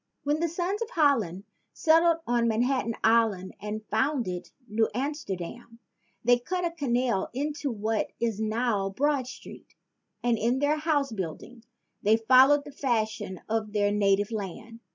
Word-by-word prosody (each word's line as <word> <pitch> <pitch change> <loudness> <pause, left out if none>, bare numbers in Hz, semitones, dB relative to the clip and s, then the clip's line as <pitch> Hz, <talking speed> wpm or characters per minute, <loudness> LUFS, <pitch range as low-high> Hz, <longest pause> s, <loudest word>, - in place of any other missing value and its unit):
When 295 +2 0
the 335 - +1
sons 360 +6 -2
of 460 - -2
Holland 235 - +1 0.3
settled 330 +1 +4
on 240 -1 +1
Manhattan 235 +1 0
Island 220 -5 +2
and 210 +1 -5
founded 220 -6 -1 0.2
New 220 +1 +1
Amsterdam, 235 - -5 0.5
they 245 +1 +4
cut 360 +8 -2
a 340 - -1
canal 250 - 0
into 290 +1 -2
what 220 -1 -1
is 230 -3 -1
now 215 -2 0
Broad 275 +4 0
Street; - - -11 0.5
and 240 -2 +2
in 240 +4 +1
their 290 +3 +2
house 300 -4 0
building 215 +5 -6 0.4
they 215 +1 +4
followed 260 +5 +5
the 290 - -9
fashions 220 - -2
of 220 -1 -2
their 205 -1 +2
native 205 0 +2
land. 220 +2 -6
235 Hz, 145 wpm, -27 LUFS, 215-285 Hz, 0.5 s, followed